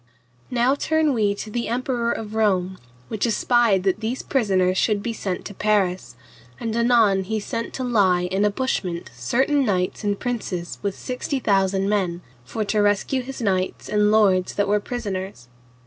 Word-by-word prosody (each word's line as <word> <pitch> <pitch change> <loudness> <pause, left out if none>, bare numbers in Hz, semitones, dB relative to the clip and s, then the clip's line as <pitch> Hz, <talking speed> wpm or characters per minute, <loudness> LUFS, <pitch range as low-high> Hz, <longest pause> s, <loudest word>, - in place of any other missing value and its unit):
Now 245 +2 +2
turn 310 +1 +1
we 210 -4 +1
to 215 - -7
the 235 +1 -2
Emperor 240 0 -1
of 215 -1 -5
Rome, 190 -4 +1 0.3
which 220 +2 -1
espied 230 -3 +2
that 190 +1 +1
these 230 +4 -3
prisoners 190 -8 +1
should 205 +1 +1
be 235 - -2
sent 190 -4 -4
to 205 - -7
Paris, 185 - 0 0.4
and 225 -1 -3
anon 230 -5 +4
he 220 +2 -1
sent 230 +2 -4
to 260 - -3
lie 195 -7 +3
in 190 +3 0
a 210 - +4
bushment 195 - -2
certain 260 - +1
knights 185 -5 -1
and 205 -1 -1
princes 205 -8 -4
with 200 -1 -3
sixty 255 +2 -3
thousand 195 -4 +1
men, 185 -4 0 0.2
for 210 - -3
to 210 +1 +1
rescue 205 +6 +1
his 255 -1 -7
knights 185 -2 -1
and 210 0 +3
lords 195 -4 +3
that 205 0 +1
were 210 +1 +2
prisoners. 195 - -5
210 Hz, 170 wpm, -23 LUFS, 190-235 Hz, 0.4 s, anon